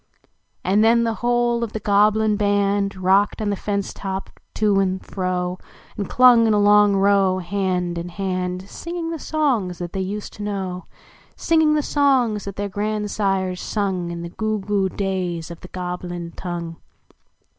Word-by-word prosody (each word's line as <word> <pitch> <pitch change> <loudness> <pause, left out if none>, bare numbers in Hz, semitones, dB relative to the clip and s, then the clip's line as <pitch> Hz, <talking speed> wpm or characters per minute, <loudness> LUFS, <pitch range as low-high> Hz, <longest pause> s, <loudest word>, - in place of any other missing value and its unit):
And 200 +3 +3
then 235 +1 +4
the 230 -1 0
whole 240 0 +1
of 225 - -4
the 220 - -3
(loblin 210 +1 +3
band 200 -1 +1
Rocked 190 +2 +2
on 210 -2 -1
the - - 0
fence 200 0 -3
to]) 190 -1 -4 0.3
to 205 -2 +2
and 190 -1 -1
fro. 180 -1 -2 0.4
And 205 - -4
clung, 245 -2 +6
in 215 - +3
a - - +3
long 205 0 +5
row, 195 -1 +3
hand 180 -2 -1
in 170 +1 -6
hand, 185 0 -3
Singing 335 +6 -5
the 325 - -4
songs 255 - 0
that 175 -1 -6
they 195 - -2
used 205 +2 -5
to - - -10
know 190 -3 -4 0.5
Singing 315 -2 +3
the 300 - +1
songs 255 -9 +2
that 200 -1 -6
their 205 0 -2
grandsires 200 -2 -1
sung 190 -5 -2
Tn 170 0 -5
the 170 - -6
goo 215 +4 -2
goo 195 -1 0
days 180 -4 -3
of 170 - -9
the - - -10
Goblin 180 -1 -5
tongue. 170 -2 -5
200 Hz, 165 wpm, -22 LUFS, 185-215 Hz, 0.5 s, clung